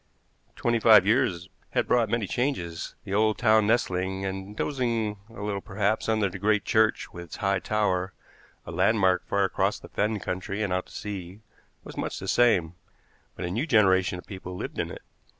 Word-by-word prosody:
Twenty 120 -1 +1
five 110 -4 +7
years 100 -6 +1 0.3
had - - +2
brought 120 -3 +3
many 115 -2 0
changes. 95 - -2
The 95 - -6
old 110 0 +2
town 110 -3 +4
nestling, 95 -5 0
and 95 +2 -5
dozing 115 -7 -1
a 105 -3 -9
little 100 -1 -2
perhaps, 100 +4 -1
under 110 -2 +2
the 95 +1 -7
great 105 +1 +2
church 110 0 +2
with 85 -1 -7
its 80 - -9
high 100 -1 0
tower, 95 -3 0 0.5
a - - -7
landmark 95 -5 +2
far 100 - +1
across 95 - 0
the - - -13
fen 105 0 -1
country 95 +3 -3
and 95 -3 -1
out 90 0 -1
to - - -17
sea, 100 -1 -7 0.4
was - - -11
much - - -3
the - - -6
same; 95 -9 +3 0.6
but 90 - -5
a 90 - -3
new 120 - -1
generation 95 - +3
of 90 - -10
people 95 -2 -8
lived - - -5
in - - -1
it. - - -9
100 Hz, 185 wpm, -27 LUFS, 95-110 Hz, 0.6 s, five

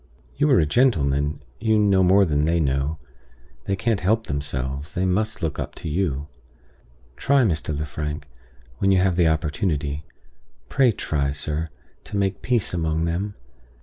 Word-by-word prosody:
You 145 +2 +2
are 130 - +6
a 80 - +3
gentleman; 75 - +1 0.2
you 110 0 +2
know 100 -2 +4
more 95 +2 +5
than 75 -3 +1
they 85 +1 +2
know; 70 +1 0 0.7
they 100 - 0
can't 110 +1 0
help 110 +4 +1
themselves; 70 0 -4
they 90 +1 +1
must 105 +2 0
look 80 -2 -2
up - - -5
to - - -7
you. 75 -4 -1 0.9
Try, 140 -1 +3
Mr. 80 -7 0
Lefrank, 75 0 -4 0.6
when 95 - +2
you 95 - +5
have 90 -1 +2
the 85 -2 +4
opportunity 75 -2 -1 0.7
pray 130 -3 +4
try, 70 -8 -1
sir, 75 +3 -3 0.4
to 100 - -4
make 95 -1 0
peace 120 -7 0
among 80 -1 0
them. 95 +5 -2
85 Hz, 155 wpm, -23 LUFS, 75-100 Hz, 0.9 s, are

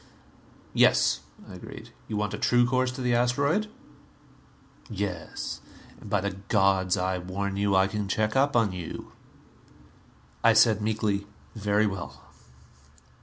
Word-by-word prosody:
"Yes," - - +4 0.3
I - - -11
agreed. - - -10 0.2
"You 105 - -3
want 105 0 -1
a - - -4
true 120 0 +3
course 130 +1 +1
to 130 - -6
the 125 -1 +1
asteroid?" 140 - +1 1.2
"Yes. 100 -6 -4 0.4
And 105 - -11
by 100 -1 +1
the 100 -1 -3
gods, 95 -2 +2
I 90 0 -1
warn 95 +2 -3
you, 100 0 +1
I 95 0 +5
can 105 0 -3
check 110 +4 0
up 140 +1 +2
on 115 -4 +3
you!" 90 -3 -7 1.3
I 115 - +6
said 110 -1 +5
meekly, 105 -2 -1 0.3
"Very 105 -1 +1
well. 85 -9 -5
105 Hz, 135 wpm, -27 LUFS, 95-115 Hz, 1.3 s, I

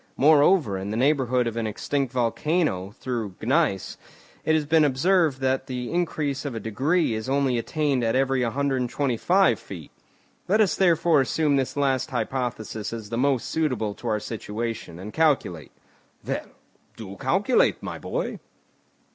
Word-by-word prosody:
Moreover, 145 - +4
in 95 +1 -5
the 110 - -2
neighbourhood 130 -2 +2
of 115 -1 -3
an 115 -1 -1
extinct 135 +4 -2
volcano, 125 - 0
through 115 -3 -5
gneiss, 130 - 0 0.5
it 160 - +2
has 155 -2 +1
been 160 +1 +4
observed 150 0 +2
that 130 0 0
the 125 -2 -4
increase 155 -5 -1
of 140 -5 -4
a - - -3
degree 130 - 0
is 110 +3 -4
only 135 -3 +1
attained 140 0 0
at 115 +1 +1
every 135 0 +2
125 130 - +1
feet. 85 -6 -10 0.6
Let 210 +4 +3
us 205 -7 +3
therefore 165 -4 +3
assume 145 +2 +1
this 135 +1 -1
last 135 -2 +1
hypothesis 120 -3 -3
as 110 -3 -7
the 115 - -2
most 135 -2 +1
suitable 130 -10 -1
to - - -9
our 105 - +1
situation, 110 -4 -5
and 100 +4 -8
calculate." 140 - +1 0.5
"Well, - - -3 0.5
do 100 -3 -8
calculate, 190 - +2
my - - -5
boy." - - -3
130 Hz, 150 wpm, -25 LUFS, 115-150 Hz, 0.6 s, Moreover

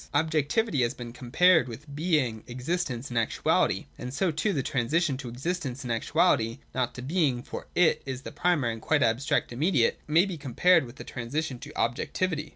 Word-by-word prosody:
Objectivity 155 - +1
has 120 +2 0
been 120 -2 -8
compared 155 +6 +4
with 140 +5 -9
being, 145 -9 0
existence, 130 0 -3
and 120 -2 0
actuality; 115 - +1
and 125 - -5
so 175 +6 0
too 160 +8 0
the 140 -8 -1
transition 145 +3 +1
to 130 -2 -6
existence 135 0 -3
and 120 - -4
actuality 115 -2 +2 0.2
(not 130 -2 -1
to 125 - -7
being, 140 -5 +1
for - - -7
it 165 -3 +4
is 135 -1 -5
the - - -7
primary 150 -10 +1
and 115 - -9
quite 155 +2 +2
abstract 120 +2 +1
immediate) 140 -2 +2
may 165 +5 +4
be 185 -4 -5
compared 155 +4 +3
with 120 - -12
the - - -9
transition 130 +2 -4
to - - -9
objectivity. 150 +6 -1
140 Hz, 180 wpm, -27 LUFS, 120-165 Hz, 0.2 s, compared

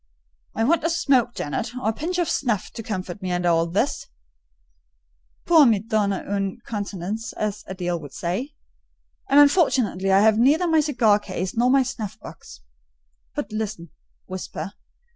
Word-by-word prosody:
"I 225 - 0
want 325 +8 +2
a 330 - +1
smoke, 275 -8 +2
Jane, 145 - -4
or 245 0 -3
a - - 0
pinch 335 +10 -3
of 350 -2 +1
snuff, 235 -10 -1
to - - -7
comfort 190 -3 -5
me 185 -1 -3
under 175 0 +1
all 165 0 +2
this, 205 +11 -1 1.4
'pour 320 -5 +6
me 225 -3 +4
donner 205 -2 -1
une 195 -1 -2
contenance,' 205 0 -4
as 210 -1 -3
Adèle 175 -3 -3
would 145 -3 -10
say; 225 - -4 0.7
and 280 +2 +6
unfortunately 265 - +3
I 195 +1 +5
have 220 0 +4
neither 300 +9 +4
my 320 -1 +4
cigar 245 -9 +3
case, 185 -2 -5
nor 240 +2 +3
my 270 0 +5
snuff 235 -6 -6
box. - - -12 0.7
But 210 - -4
listen—whisper. 195 -2 -7
215 Hz, 155 wpm, -23 LUFS, 190-265 Hz, 1.4 s, pour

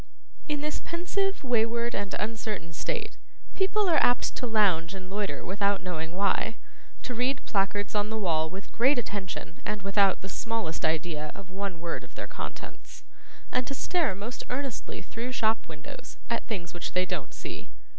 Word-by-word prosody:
In 295 -2 0
this 300 0 -1
pensive, 385 +2 0
wayward, 235 -1 +2
and 200 -1 -1
uncertain 210 -5 -2
state, 435 - -2 0.4
people 400 +1 +3
are 335 - +6
apt 245 - +4
to 250 - -1
lounge 195 -6 +4
and 185 0 -7
loiter 200 -7 -1
without 200 +1 +2
knowing 165 -2 -2
why, 200 +3 +2 0.5
to 250 - -2
read 250 +3 +1
placards 200 0 +1
on 210 0 +2
the 220 - -1
walls 160 -6 +2
with 195 +1 -7
great 260 +4 +5
attention 195 -6 -3
and 210 -2 -2
without 195 -1 +4
the 190 - -5
smallest 225 -4 -1
idea 155 -1 0
of 195 -1 -10
one 195 -2 -3
word 170 0 -2
of - - -14
their - - -3
contents, - - -7 0.5
and 255 - +1
to 275 - -2
stare 325 - +2
most 210 +6 -4
earnestly 265 -1 -3
through 240 +3 -4
shop 225 -2 +2
windows 150 -3 -9
at 235 - 0
things 175 -6 -3
which 175 - -4
they 185 0 +4
don't 180 -1 -3
see. - - -6
205 Hz, 170 wpm, -30 LUFS, 185-245 Hz, 0.5 s, are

